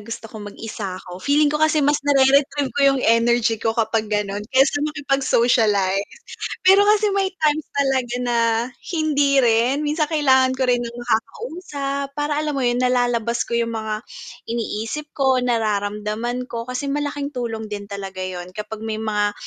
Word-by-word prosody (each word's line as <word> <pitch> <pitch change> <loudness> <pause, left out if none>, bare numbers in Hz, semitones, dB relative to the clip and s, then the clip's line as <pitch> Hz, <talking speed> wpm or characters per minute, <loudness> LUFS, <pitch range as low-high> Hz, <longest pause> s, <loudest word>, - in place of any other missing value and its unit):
gusto 230 0 -7
kong 210 -2 -8
mag-isa 205 -3 -6
ako. 180 -1 -10
Feeling 290 +3 +3
ko 300 - 0
kasi 310 -1 +3
mas 290 +1 +3
nare-retrieve 275 0 +3
ko 285 - -2
'yong 270 -2 +3
energy 230 0 +3
ko 225 0 0
kapag 220 -1 0
gano'n, 205 -1 -1
kaysa 270 +2 +3
makipag-socialize. 235 -9 +1 0.5
Pero 390 +2 +6
kasi 425 0 +4
may 390 -1 +1
times 310 -2 0
talaga 265 -3 0
na 240 -1 0 0.6
hindi 290 -3 +3
rin. 240 +5 +2
Minsan 300 +1 +1
kailangan 265 -4 +3
ko 260 - -1
rin 245 - +3
ng 235 -1 -5
makakausap, 275 - -3
para, 295 0 -1
alam 305 -1 -2
mo 270 - -1
'yon, 240 0 +1
nalalabas 245 -2 +1
ko - - -15
'yong 230 0 -1
mga 220 -1 -3 0.5
iniisip 230 +5 -4
ko, 265 -2 +3
nararamdaman 215 +1 -1
ko. 230 -1 -5
Kasi 255 +3 -3
malaking 290 0 -3
tulong 225 -3 -3
din 205 -1 -5
talaga 195 -1 -6
'yon 180 -1 -5
kapag 210 +1 -6
may 220 -1 -3
mga 210 -1 0
245 Hz, 160 wpm, -21 LUFS, 220-285 Hz, 0.6 s, Pero